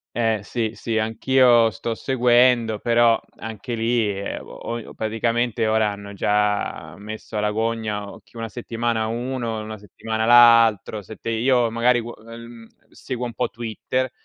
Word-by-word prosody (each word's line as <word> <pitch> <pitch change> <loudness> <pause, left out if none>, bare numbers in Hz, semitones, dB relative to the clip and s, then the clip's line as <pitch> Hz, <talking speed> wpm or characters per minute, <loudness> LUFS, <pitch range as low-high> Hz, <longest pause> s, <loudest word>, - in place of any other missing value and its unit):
eh 115 -3 +1
sì, 115 0 -3
sì, 110 -1 -2
anch'io 120 +1 +4
sto 115 0 -4
seguendo 120 -3 +3
però 115 -1 +3 0.2
anche 110 +2 -7
lì, 115 -1 +1
ehm, 100 +1 -5
oi 115 -1 -7
praticamente 115 +1 -1
ora 110 -1 +2
hanno 100 0 -9
già 105 +1 -1
messo 110 +1 -9
alla 105 0 +1
gogna 110 -2 -3
chi 115 - -17
una 115 0 -4
settimana 115 -1 -2
uno, 120 -1 -3
una 110 0 -7
settimana 110 +2 -4
l'altro, 115 -3 +5
se 110 +3 -11
te 115 - -6
io 120 0 +2
magari 120 +1 +3
qu 120 +1 -8
mhmm, 115 0 -11 0.2
seguo 125 -2 -5
un 120 - -6
po' 125 0 -1
Twitter, 120 +3 -3
115 Hz, 145 wpm, -22 LUFS, 110-120 Hz, 0.2 s, l'altro